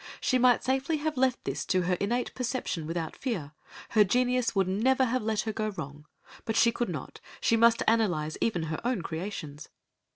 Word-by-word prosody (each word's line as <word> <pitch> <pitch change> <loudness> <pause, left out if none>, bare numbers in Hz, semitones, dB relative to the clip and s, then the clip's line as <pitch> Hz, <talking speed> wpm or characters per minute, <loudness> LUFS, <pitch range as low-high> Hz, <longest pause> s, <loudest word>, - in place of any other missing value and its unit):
She 255 - +1
might 245 -1 +4
safely 270 +4 0
have 305 +1 -2
left 255 -1 +1
this - - -2
to 185 -2 +2
her 180 +1 +1
innate 240 +5 -1
perception 235 - -3
without 165 -1 -3
fear, 185 - -3 0.4
her 215 -2 +5
genius 250 +3 +1
would 195 -2 +2
never 255 +8 +2
have 255 +1 0
let 215 0 0
her 220 - -3
go 215 0 -1
wrong, 150 -6 -8 0.4
but 225 - -2
she 235 - +5
could 240 0 -2
not, - - -6 0.2
she 230 - +2
must 230 0 +4
analyse 175 -9 +1
even 180 -8 0
her 160 0 -4
own 240 -7 -1
creations. 160 -4 -6
220 Hz, 190 wpm, -28 LUFS, 175-250 Hz, 0.4 s, her